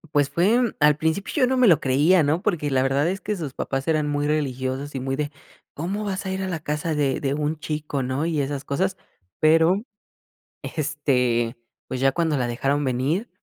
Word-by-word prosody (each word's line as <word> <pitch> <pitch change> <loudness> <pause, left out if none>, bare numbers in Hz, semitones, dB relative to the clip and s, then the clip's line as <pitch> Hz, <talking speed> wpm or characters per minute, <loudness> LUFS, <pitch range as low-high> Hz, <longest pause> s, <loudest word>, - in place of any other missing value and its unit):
Pues 145 -1 +3
fue 210 - +2
al 150 0 +5
principio 160 +5 -1
yo - - +5
no 260 - +1
me 255 -2 +5
lo 165 - +5
creía 150 +7 +4
¿no?, 155 +4 +1
porque 170 -8 0
la 130 -1 +2
verdad 135 +3 +1
es 190 +3 -2
que 210 - -2
sus 150 -6 -5
papás 135 0 -3
eran 155 -2 +1
muy 145 0 0
religiosos 135 -1 -2
y 135 - -3
muy 135 +1 -2
de: 145 +1 -2 0.4
"¿Cómo 190 +7 -3
vas 195 -1 -3
a 190 - -2
ir 190 0 -2
a 190 - -3
la 165 -3 -3
casa 150 +1 -2
de 140 -3 0
de 140 -1 0
un 150 +2 -1
chico?", 150 -3 -3
¿no? 130 +4 -1
Y 160 -3 0
esas 140 0 -3
cosas 185 +7 -1 0.4
pero, 165 +5 +4 0.8
este, 130 -6 0 0.3
pues 130 - -4
ya 135 +1 +3
cuando 165 -3 +1
la 125 -3 0
dejaron 135 +5 0
venir 140 - -1
150 Hz, 205 wpm, -24 LUFS, 135-170 Hz, 0.8 s, al